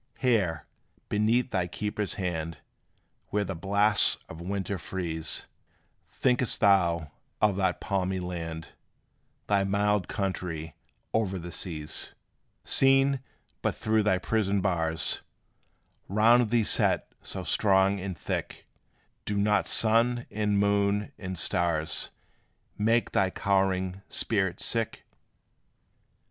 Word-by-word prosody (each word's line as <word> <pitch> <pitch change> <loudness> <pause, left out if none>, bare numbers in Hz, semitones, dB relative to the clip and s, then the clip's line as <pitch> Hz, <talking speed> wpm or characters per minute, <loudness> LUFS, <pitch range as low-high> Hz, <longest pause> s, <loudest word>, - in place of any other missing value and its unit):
Here, 100 - +1 0.4
beneath 115 +5 +1
thy 90 -3 0
keeper's 105 +2 -3
hand, 85 -4 -3 0.7
Where 105 0 0
the 95 - -4
blasts 100 +4 +4
of 80 - -10
winter 95 +1 -3
freeze, 85 -3 -3 0.6
Think'st 125 -2 0
thou 85 -6 +3 0.3
of 105 -2 +3
that 95 -2 0
palmy 95 -1 -1
land, 85 -3 -5 0.8
Thy 100 -1 +2
mild 100 -1 +1
country 90 -6 -3 0.4
o'er 100 -4 0
the 85 0 -7
seas? 80 -3 -4 0.5
Seen 135 0 +4 0.4
but - - 0
through 110 0 +1
thy 100 -3 +2
prison 100 0 0
bars, 80 -4 0 0.9
Round 115 +3 +4
thee 115 0 +3
set - - +2
so - - -6
strong 95 -1 +3
and 95 -2 -5
thick, - - -4 0.6
Do 105 - -1
not 105 0 +2
sun, 120 +2 +3
and 105 -1 0
moon, 100 0 +1
and 95 -2 -5
stars 80 -2 0 0.7
Make 115 +3 +1
thy 95 -1 +2
cowering 95 -1 0
spirit 95 -5 0
sick? 115 -1 -2
100 Hz, 110 wpm, -28 LUFS, 90-105 Hz, 0.9 s, blasts